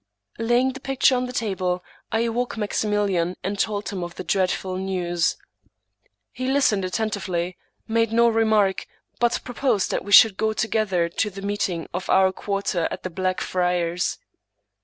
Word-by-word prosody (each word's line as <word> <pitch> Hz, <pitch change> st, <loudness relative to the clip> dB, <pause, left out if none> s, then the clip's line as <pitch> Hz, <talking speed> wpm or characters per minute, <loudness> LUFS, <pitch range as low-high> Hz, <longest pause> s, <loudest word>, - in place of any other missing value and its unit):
Laying 240 Hz, +3 st, +2 dB
the 270 Hz, -, -8 dB
picture 270 Hz, -1 st, +2 dB
on 250 Hz, 0 st, -1 dB
the -, -, -6 dB
table, 185 Hz, -6 st, -1 dB, 0.3 s
I 225 Hz, -, +1 dB
awoke 235 Hz, +1 st, -1 dB
Maximilian, 205 Hz, -4 st, 0 dB
and 195 Hz, +1 st, -3 dB
told 205 Hz, -1 st, -1 dB
him 190 Hz, -3 st, -4 dB
of 175 Hz, 0 st, -7 dB
the -, -, -6 dB
dreadful 185 Hz, 0 st, 0 dB
news. 180 Hz, -3 st, -1 dB, 0.9 s
He 255 Hz, -, -4 dB
listened 265 Hz, -7 st, +2 dB
attentively, 185 Hz, -3 st, -2 dB, 0.3 s
made 230 Hz, 0 st, +1 dB
no 235 Hz, +1 st, +4 dB
remark, 220 Hz, -4 st, +2 dB, 0.3 s
but 240 Hz, 0 st, +2 dB
pro 245 Hz, -, -7 dB
posed 230 Hz, -6 st, +1 dB
that -, -, -1 dB
we 205 Hz, -, -8 dB
should 205 Hz, -1 st, +8 dB
go 220 Hz, 0 st, +1 dB
together 215 Hz, -6 st, 0 dB
to 210 Hz, +5 st, -1 dB
the 195 Hz, 0 st, -9 dB
meeting 195 Hz, -5 st, -2 dB
of 180 Hz, +1 st, -4 dB
our 190 Hz, 0 st, +5 dB
quarter 195 Hz, -3 st, -1 dB
at -, -, -7 dB
the 185 Hz, -, -4 dB
Black 185 Hz, +1 st, -1 dB
Friars. 180 Hz, -1 st, 0 dB
200 Hz, 160 wpm, -23 LUFS, 185-225 Hz, 0.9 s, should